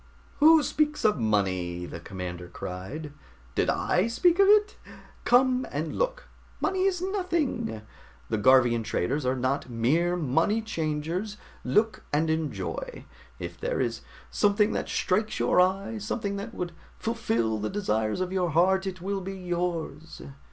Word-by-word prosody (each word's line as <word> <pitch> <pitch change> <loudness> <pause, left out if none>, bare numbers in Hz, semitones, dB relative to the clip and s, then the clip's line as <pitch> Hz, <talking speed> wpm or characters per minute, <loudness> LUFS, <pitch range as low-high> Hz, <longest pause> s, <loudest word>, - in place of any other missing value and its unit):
"Who 315 +1 +7
speaks 300 0 0
of 210 -9 +3
money?" 95 -5 0
the 85 - -7
commander 90 -1 -6
cried. 95 - -7 0.4
"Did - - +1
I 145 - +1
speak 340 +10 +2
of 395 - +7
it? 415 0 +5 0.5
Come 255 +1 +4
and 155 +3 -3
look! - - -2 0.3
Money 380 -1 0
is 365 -2 0
nothing. 335 - -1 0.4
The - - -1
Garvian 120 0 +5
traders 125 +5 -1
are 130 - +2
not 130 +1 -1
mere 150 +10 +1
money 170 - +1
changers. 165 +3 -3 0.3
Look 220 +2 +1
and 160 +2 +1
enjoy; 160 - -4 0.3
if - - -7
there - - -2
is - - -1 0.3
something 205 +1 +3
that - - -3
strikes 215 +3 0
your - - +4
eye, 195 +4 0
something 205 -1 -3
that 215 +4 -7
would 175 -1 -3 0.3
fulfill 115 - -1
the 105 - -2
desires 110 - -1
of 185 0 -2
your 180 -2 +1
heart, 190 +4 +3
it 185 -2 -5
will 195 +1 -2
be 195 +1 -5
yours." 175 -3 -4
180 Hz, 145 wpm, -27 LUFS, -, 0.5 s, Who